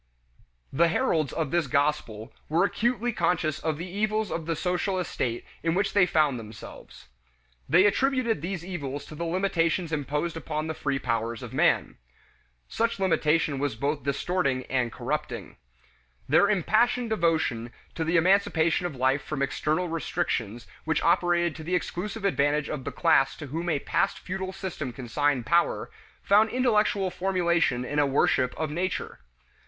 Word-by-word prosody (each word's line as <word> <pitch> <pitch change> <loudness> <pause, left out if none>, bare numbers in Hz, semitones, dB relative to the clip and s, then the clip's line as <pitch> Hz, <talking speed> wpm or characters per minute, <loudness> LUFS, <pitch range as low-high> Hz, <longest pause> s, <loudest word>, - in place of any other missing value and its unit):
The 170 +5 +4
heralds 165 - +1
of 160 -4 -2
this 170 -4 +1
gospel 135 -5 -1 0.2
were 165 +4 +3
acutely 240 +2 0
conscious 165 -5 0
of 160 -2 -2
the 170 +3 -5
evils 215 +2 -1
of 165 -1 -4
the 165 - 0
social 180 +3 -1
estate 125 -9 -2 0.2
in 165 0 0
which 195 +1 0
they 190 -4 +5
found 150 -6 +2
themselves. 110 -1 -11 0.6
They 175 +7 +6
attributed 255 - +1
these 175 0 -4
evils 145 -6 -5
to - - -11
the 170 +3 -4
limitations 170 -1 0
imposed 150 +3 -2
upon 155 -1 -3
the 160 - -3
free 135 -2 -2
powers 115 -2 -2
of - - -8
man. - - +2 0.7
Such 230 -2 -1
limitation 160 -6 +1
was 140 -5 -1
both 145 +5 -1
distorting 140 -2 -1
and 125 -3 +1
corrupting. - - -4 0.7
Their 160 +8 +4
impassioned 225 +5 +2
devotion 160 - 0 0.2
to 160 -1 -3
emancipation 175 -1 +3
of 160 - -8
life 130 +2 +1
from 150 -2 -2
external 155 +5 0
restrictions 120 -8 -2 0.2
which 160 -2 0
operated 170 -1 +2
to 160 - -8
the 180 +3 -1
exclusive 200 +4 -3
advantage 145 -5 +1
of 140 -4 -5
the - - -3
class 135 0 +3
to 150 - -7
whom 165 +5 -3
a 155 - +2
past - - 0
feudal 190 +1 -4
system 180 -9 -5
consigned 130 +1 0
power, 170 +4 +1 0.3
found 210 +3 +4
intellectual 215 -6 +1
formulation 170 -9 +1
in 145 +3 -1
a 145 - +3
worship 130 -2 +1
of 155 -2 -2
nature. 175 +3 -3
165 Hz, 155 wpm, -27 LUFS, 140-185 Hz, 0.7 s, They